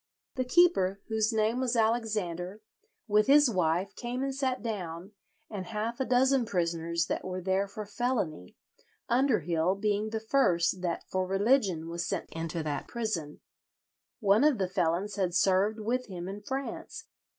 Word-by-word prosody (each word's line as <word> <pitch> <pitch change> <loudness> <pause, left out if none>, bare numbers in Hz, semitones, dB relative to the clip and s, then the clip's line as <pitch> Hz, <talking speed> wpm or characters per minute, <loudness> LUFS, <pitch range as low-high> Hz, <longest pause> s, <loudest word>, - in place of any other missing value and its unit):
The 255 -1 -2
keeper, 250 - +3
whose 220 0 +1
name 220 +2 +1
was 255 -2 0
Alexander, 215 -4 -1 0.4
with 210 0 +3
his 285 -2 +6
wife 180 0 0
came 245 +2 -3
and 270 0 -1
sat 260 -4 -1
down, 185 -4 -5 0.4
and 190 -4 -6
half 225 +3 -3
a 265 - 0
dozen 260 +1 +3
prisoners 170 -4 -1
that - - -3
were 185 0 -4
there 190 +2 0
for 210 +2 -7
felony, 205 - -2 0.5
Underhill 185 - +2
being 210 +1 0
the 220 0 -2
first 190 -7 +2
that 175 -2 -2
for 185 0 -1
religion 195 -4 +2
was 170 +1 -3
sent - - -3
into 165 0 -4
that 150 -2 -3
prison. 215 -11 -4 0.8
One 205 +3 +4
of 300 -4 +4
the 190 -2 0
felons 185 +2 -1
had 180 -3 0
served 195 +4 +3
with 245 +4 -1
him 180 -3 -6
in 200 +2 -6
France. 265 +5 -5
205 Hz, 155 wpm, -29 LUFS, 180-235 Hz, 0.8 s, his